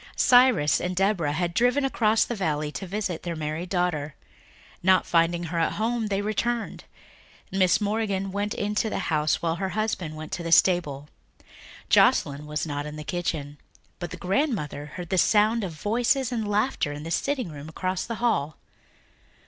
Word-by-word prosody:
Cyrus 245 - +5
and 180 +1 -2
Deborah 185 -6 +1
had 170 +2 -1
driven 245 +7 +2
across 225 -4 +2
the - - -4
valley 155 -7 -1
to 190 - -6
visit 190 -3 -3
their 170 -1 -4
married 155 +3 -4
daughter. 170 -5 -1 0.7
Not 185 0 +4
finding 170 +1 +2
her 170 0 -2
at 165 - +1
home 225 +1 -1
they 200 -1 -1
returned. 230 +2 -2 0.7
Mrs. 190 +1 +3
Morgan 200 -2 -1
went 205 +2 -2
into 210 +2 -1
the - - -3 0.2
house 155 +1 +1
while 165 0 0
her 190 +1 -2
husband 185 -8 -2
went 155 0 -8
to - - -3
the 165 -1 -4
stable. 150 -6 +3 0.8
Joscelyn 145 +1 +3
was 150 +1 -2
not 145 -1 -4
in 150 - -7
the 155 - -7
kitchen, 150 -4 -3 0.4
but 175 -1 -4
the 185 - -7
grandmother 180 - -1
heard 175 +3 -8
the 190 - +2
sound 215 +3 +3
of 180 -4 -4
voices 240 - 0
and 225 -3 -2
laughter 205 - 0
in 145 +1 -7
the 165 - -6
sitting 265 -1 -1
room 150 0 -9
across 185 +3 -2
the 230 - -4
hall. 160 - 0
180 Hz, 175 wpm, -26 LUFS, 155-215 Hz, 0.8 s, Cyrus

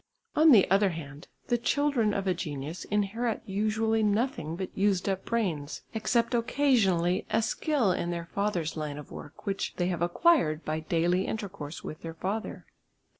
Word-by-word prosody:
On 315 +1 +6
the 210 -7 +7
other 195 0 +5
hand, 150 -4 -8 0.2
the 240 -1 +1
children 260 -3 +2
of 200 -1 -2
a 185 - +2
genius 155 -1 -5
inherit 210 +3 -1
usually 215 +3 +1
nothing 210 - 0
but 185 +1 -6
used 195 -2 +1
up 195 -1 -1
brains, 170 -11 -2
except 230 +2 +1
occasionally 225 -8 +2
a 225 +1 +2
skill 270 - +1
in 175 -1 -1
their 170 -1 -3
father's 180 -3 -2
line 150 -2 -4
of 150 - -10
work, 145 - -10
which 195 -1 -2
they 180 0 0
have 175 -3 -2
acquired 175 - +3
by 155 +1 -1
daily 170 +3 +1
intercourse 190 -8 -5
with 155 - -7
their 165 -1 -7
father. 200 +6 -4
195 Hz, 165 wpm, -29 LUFS, 165-225 Hz, 0.2 s, the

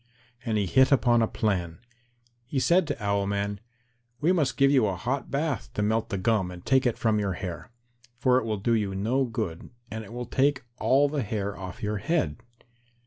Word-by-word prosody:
And 115 -3 0
he 105 - +1
hit 130 +8 +4
upon 120 -4 +4
a 115 - +3
plan. 90 -8 -1 0.7
He 135 +1 -1
said 170 +4 +3
to 145 -7 -4
Owl 100 -1 +1
man, 100 0 -2 0.6
"We 160 +5 +3
must 155 -8 +1
give 140 0 +5
you 130 -6 +4
a 95 - -1
hot 125 +9 -3
bath 140 -5 -2
to 105 - 0
melt 110 +2 0
the 95 - -2
gum 105 -2 +1
and 90 -1 -10
take 135 -1 +3
it 120 - -1
from 110 -2 +1
your 100 -2 -1
hair, 90 -1 -6 0.5
for 125 0 +3
it 130 - -5
will 110 -2 -1
do 100 +4 -1
you 105 -4 0
no 120 +8 +1
good, 110 -9 -4 0.2
and 110 0 -5
it 110 - -12
will 120 +1 -5
take 135 +1 +1 0.2
all 140 +2 +4
the 145 0 -2
hair 100 -2 -3
off 95 +1 -8
your 105 0 -1
head." 100 - 0
110 Hz, 205 wpm, -27 LUFS, 100-130 Hz, 0.7 s, give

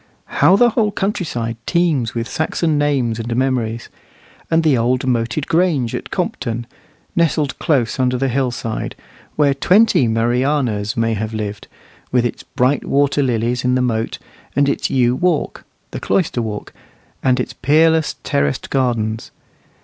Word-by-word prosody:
How 190 - +7
the 240 +3 +4
whole 215 -2 +1
countryside 160 - -2
teems 155 -10 +1
with 115 0 -2
Saxon 155 0 -1
names 130 -6 0
and 115 +1 -3
memories! 120 -3 -1 0.6
And 165 0 +3
the 155 -4 +4
old 125 +2 +1
moated 120 +3 0
grange 160 -9 +1
at - - -5
Compton, 120 0 -3 0.5
nestled 155 -4 +1
close 135 -7 0
under 125 -1 +2
the 135 +2 0
hillside, 120 -3 -2 0.4
where 145 -2 +3
twenty 180 - +4
Marianas 120 -1 0
may 115 0 +1
have 110 +1 -3
lived, 105 -1 -5 0.4
with 125 -1 +2
its 120 - -3
bright 130 +3 0
water 145 +1 +2
lilies 120 -1 0
in 125 0 +2
the 130 - +2
moat, 115 -2 -1 0.4
and 140 +1 +3
its 140 - 0
yew 125 -2 +2
walk, 175 0 -1 0.3
"the - - -5
cloister 165 -9 0
walk," 105 -2 -5 0.5
and 130 -1 +2
its - - -3
peerless 160 +3 +3
terraced 70 0 -1
gardens. 115 -4 -1
125 Hz, 145 wpm, -18 LUFS, 115-150 Hz, 0.6 s, How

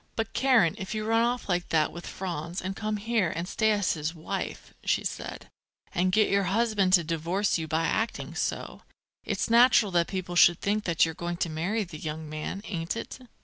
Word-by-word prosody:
"But, 225 - -3
Karen, 250 -11 +4
if 190 +3 -4
you 215 0 -2
run 225 +1 +3
off 245 +1 0
like 180 -2 -1
that 155 -2 +2
with 170 - -9
Franz 175 -1 -4
and 190 +1 -4
come 215 0 -2
here 215 -3 0
and 170 +2 -3
stay 220 +3 +1
as 205 -2 +2
his 155 +1 -3
wife," 160 - -5
she - - +1
said, - - -5 0.5
"and 185 +1 +1
get 215 +3 +4
your 200 -1 +2
husband 210 -3 +1
to 175 -3 +6
divorce 170 +5 0
you 160 - -4
by 160 +1 0
acting 225 +7 -1
so, - - -3 0.4
it's - - -1
natural 235 -3 +5
that 170 -1 +2
people 185 -2 -4
should 175 -1 +6
think 210 +1 -1
that 170 -2 +3
you're 160 - -4
going 170 +1 -4
to 170 - -1
marry 185 +8 -1
the 165 -5 -9
young 155 0 -5
man, 155 +6 -5
ain't 170 +2 -3
it?" 230 - -6
185 Hz, 205 wpm, -28 LUFS, 165-215 Hz, 0.5 s, to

